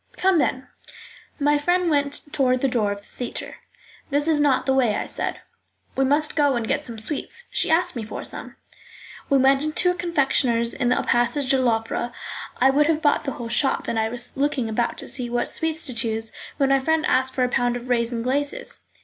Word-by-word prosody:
"Come, 375 -2 +3
then." 260 -2 -1 0.7
My 290 0 +3
friend 355 +4 +1
went 285 -2 0
toward 255 -2 +2
the 275 - +3
door 225 -5 0
of 200 0 -5
the - - -22
theatre. 245 - -6 0.5
"That 290 +1 +2
is 315 -2 +3
not 275 -3 +2
the 265 - +2
way," 245 -6 +2
I - - -2
said. - - -3 0.5
"We 270 - +2
must 295 +3 +2
go 285 -3 +3
and 230 -2 -2
get 285 +2 0
some 235 -4 -4
sweets. 295 - -3
She - - +1
asked 345 +1 +2
me 235 - -3
for 215 - -6
some." - - -6 0.7
We 275 - +4
went 270 +1 +4
into 310 +4 +1
a - - -1
confectioner's 270 -9 +1
in 245 - 0
the 250 - +3
passage 245 +3 +1
de 265 -1 +3
l'Opera. 230 0 0 0.5
I 265 +2 +5
would 295 +2 +3
have 320 -1 0
bought 290 0 +2
the 275 - -2
whole 235 - -6
shop, 270 +4 +1
and 225 - 0
I 220 0 0
was 245 +1 -5
looking 275 -3 0
about 235 +2 -1
to - - -7
see 250 -1 -3
what 240 0 0
sweets 320 0 -1
to 255 - +1
choose, 225 -1 -1 0.3
when 275 -3 +2
my 275 0 +4
friend 320 +3 +1
asked 260 0 +1
for 255 - +1
a - - +3
pound 245 0 +1
of 245 +1 -9
raisins 235 -1 0
glaces. 285 - -2
265 Hz, 215 wpm, -23 LUFS, 240-295 Hz, 0.7 s, I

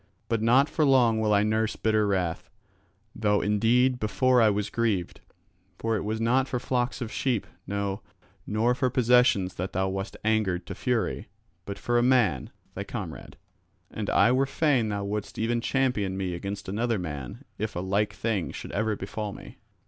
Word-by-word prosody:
But 115 -2 0
not 125 +5 +4
for 155 - 0
long 125 -5 +4
will 105 -1 +1
I 100 0 +4
nurse 110 +1 0
bitter 110 -1 +1
wrath, 90 -4 -1 0.7
though 105 -1 +2
indeed 120 +5 +2
before 125 +3 +3
I 110 - +6
was 105 0 -1
grieved. 110 -7 -1 0.6
For 115 0 -1
it 105 - -1
was 110 +1 -2
not 125 +4 +2
for 125 - -2
flocks 125 +1 -1
of 115 -2 -4
sheep, 125 -6 -1 0.2
no, 100 0 -2 0.5
nor 110 +3 +2
for 130 0 0
possessions 125 -6 +3
that 90 +2 -4
thou 95 +1 0
wast 95 +1 -4
angered 105 -5 +1
to - - -6
fury, 125 -3 -1 0.4
but 100 - -5
for 120 0 +1
a - - +3
man, 120 - +2 0.2
thy - - -4
comrade. - - -7 0.5
And - - -4
I 120 - +4
were 135 +2 +2
fain 135 -6 +1
thou 100 -1 -2
wouldst 100 +1 -4
even 115 +1 0
champion 115 -8 0
me 95 -2 -2
against 100 +3 -5
another 115 +4 0
man 75 -8 -6
if 110 +1 -3
a - - -2
like 100 +3 0
thing 110 -6 -2
should - - -8
ever 105 +1 0
befall 100 +1 -5
me." - - -12
110 Hz, 180 wpm, -27 LUFS, 100-120 Hz, 0.7 s, I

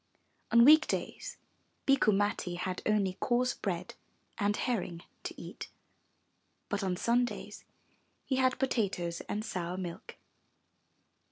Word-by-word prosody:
On 235 0 +7
week 310 +2 +8
days - - -3 0.5
Bikku 275 -5 +4
Matti 195 -3 0
had 180 +1 -3
only 200 -3 +1
coarse 250 +1 +2
bread 180 -3 -3 0.5
and 205 0 +1
herring 180 -8 -2 0.2
to - - -5
eat, - - -8 1.0
but 205 -1 -1
on 185 -2 0
Sundays 240 +4 -1 0.6
he 260 - 0
had 255 -1 +3
potatoes 195 -10 -1
and 210 +1 -2
sour 180 0 -3
milk. 175 -3 -6
205 Hz, 115 wpm, -31 LUFS, 180-245 Hz, 1.0 s, week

